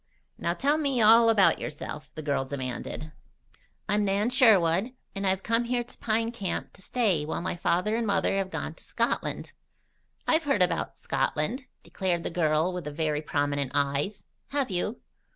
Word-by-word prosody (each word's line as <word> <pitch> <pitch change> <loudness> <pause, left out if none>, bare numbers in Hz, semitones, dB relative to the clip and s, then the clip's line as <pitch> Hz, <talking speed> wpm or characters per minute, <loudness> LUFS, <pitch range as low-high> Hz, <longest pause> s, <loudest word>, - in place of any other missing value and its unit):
"Now 170 - -1
tell 285 - +2
me 275 -5 +1
all 230 +1 +7
about 205 -4 +4
yourself," 150 0 -6
the 155 - -6
girl 140 -2 0
demanded. 135 +3 -5 0.8
"I'm 210 0 +2
Nan 205 +4 +1
Sherwood, 215 -3 +4 0.2
and 195 0 -2
I've 190 0 +1
come 230 +1 +1
here 240 0 0
to 240 - -14
Pine 225 +1 0
Camp 200 -6 -4
to 190 - -17
stay 200 -8 +1
while 155 - -3
my 185 - -2
father 180 +5 +1
and 230 -1 -1
mother 195 -1 +1
have 195 -1 -1
gone - - -4
to - - -16
Scotland." - - -2 0.7
"I've 320 0 +2
heard 275 -10 +3
about 180 - -1
Scotland," 250 - -1 0.2
declared 180 -3 -2
the - - -3
girl 160 +1 +1
with 180 -3 -5
the 150 - -4
very 150 0 -1
prominent 145 -2 -1
eyes. 145 +8 0 0.2
"Have 275 -5 -1
you?" 190 +6 -2
190 Hz, 170 wpm, -27 LUFS, 155-230 Hz, 0.8 s, all